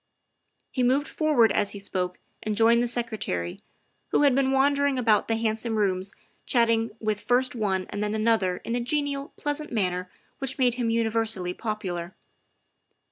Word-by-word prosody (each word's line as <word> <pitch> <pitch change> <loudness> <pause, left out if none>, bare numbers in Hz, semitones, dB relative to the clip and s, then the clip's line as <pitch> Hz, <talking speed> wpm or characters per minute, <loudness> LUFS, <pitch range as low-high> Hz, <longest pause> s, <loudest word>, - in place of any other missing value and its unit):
' - - -51
' - - -34
He 255 - -1
moved 265 +4 +2
forward 285 -9 +3
as 205 -1 +1
he - - -5
spoke 180 -2 -2 0.2
and 215 -1 -2
joined 230 +2 +5
the 240 - +1
Secre 235 -2 -3
tary, 85 -1 -3 0.5
who - - +2
had 280 -2 +5
been 265 0 +2
wandering 280 0 +2
about 225 -4 +3
the 225 - +1
handsome 225 0 -1
rooms 190 -1 0 0.4
chatting 230 -2 +2
with 215 -1 -1
first 250 +1 +2
one 195 -5 -1
and 205 +1 -2
then 210 +1 -1
another 215 -5 +2
in 230 - -3
the 245 - +1
genial, 280 +2 -2
pleasant 295 +1 -3
manner 180 -5 -1 0.3
which 270 -1 -2
made 250 -3 +3
him 240 -1 -1
universally 225 -5 +1
popular. 185 -5 -4
225 Hz, 175 wpm, -26 LUFS, 205-255 Hz, 0.5 s, joined